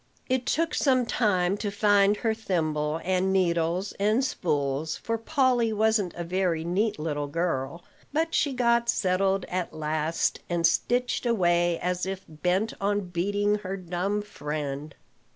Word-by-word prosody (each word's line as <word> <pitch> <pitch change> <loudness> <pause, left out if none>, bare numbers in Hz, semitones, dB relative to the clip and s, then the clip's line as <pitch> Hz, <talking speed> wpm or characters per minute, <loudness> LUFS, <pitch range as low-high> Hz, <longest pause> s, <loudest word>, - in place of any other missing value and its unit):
It 255 -1 0
took 330 +1 +1
some 255 -3 +2
time 195 -5 +1
to 205 - -2
find 205 0 +3
her 225 0 0
thimble 160 -7 -1
and 185 +1 +1
needles 175 0 +1
and 215 +6 +2
spools, 150 - -1
for 230 - -2
Polly 250 -3 +2
wasn't 215 -4 +1
a 175 - -4
very 175 -2 0
neat 195 +6 0
little 150 -2 -2
girl; 165 0 -2 0.3
but 325 +3 0
she 290 - +2
got 235 -2 +2
settled 190 -1 +1
at 180 -1 -3
last, 155 +1 -1
and 170 -1 +1
stitched 245 +8 +1
away 175 -6 +2
as 180 +1 -2
if 190 0 -5
bent 180 +7 -1
on 200 -2 0
beating 205 +4 +1
her 195 -1 -5
dumb 185 +3 -2
friend. 150 -6 -5
185 Hz, 145 wpm, -27 LUFS, 170-220 Hz, 0.3 s, find